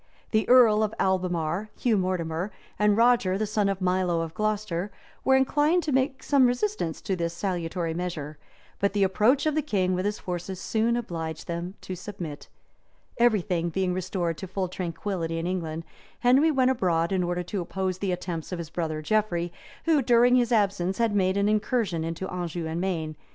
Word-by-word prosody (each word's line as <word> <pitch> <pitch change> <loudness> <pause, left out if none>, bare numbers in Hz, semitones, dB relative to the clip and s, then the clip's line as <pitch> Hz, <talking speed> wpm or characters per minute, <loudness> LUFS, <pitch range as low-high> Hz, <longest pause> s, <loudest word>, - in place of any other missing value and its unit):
The 215 -1 +1
earl 235 -4 +7
of 215 0 0
Albemarle, 180 0 0
Hugh 235 -3 +2
Mortimer, 180 -1 -1 0.3
and 210 0 +4
Roger 230 -6 +4
the 215 - 0
son 210 -1 +1
of 195 -1 -2
Milo 180 -2 +1
of 165 -1 -5
Glocester, 210 -2 -1 0.3
were 265 - +4
inclined 295 +6 +3
to 305 - -2
make 265 +1 0
some 275 -3 +4
resistance 245 - -1
to 190 - -1
this 170 -1 -2
salutary 175 -2 -2
measure; 160 -4 -4 0.4
but 200 0 +1
the 205 -1 +2
approach 215 +9 +3
of 310 - +2
the 310 - +1
king 190 -10 0
with 185 +1 -1
his 205 +1 -1
forces 180 +1 -5
soon 230 +4 +1
obliged 165 -8 -5
them 175 +2 -4
to 185 - -5
submit. 175 -6 -7 0.7
{1156.} 235 - +5
Everything 180 -6 0
being 185 +1 0
restored 180 -2 -2
to 190 - -6
full 190 0 -2
tranquillity 170 -1 -3
in 165 - -2
England, 165 -3 -3 0.4
Henry 265 +6 +5
went 260 -3 +3
abroad 170 -8 +1
in 190 -1 +1
order 175 0 -1
to 185 +2 -3
oppose 185 +1 -3
the 195 -1 -1
attempts 175 -2 -4
of 180 - -2
his 170 -2 -7
brother 155 -3 -3
Geoffrey, 175 -3 0 0.3
who, 320 -3 +4
during 245 0 +5
his 245 -1 +2
absence, 195 -4 +1
had 230 -2 +1
made 190 -1 +2
an 200 0 +2
incursion 215 -5 0
into 165 +3 -4
Anjou 175 -2 -4
and 160 +2 -3
Maine, 170 -5 -1
{1157. 155 - -9
185 Hz, 190 wpm, -26 LUFS, 170-215 Hz, 0.7 s, earl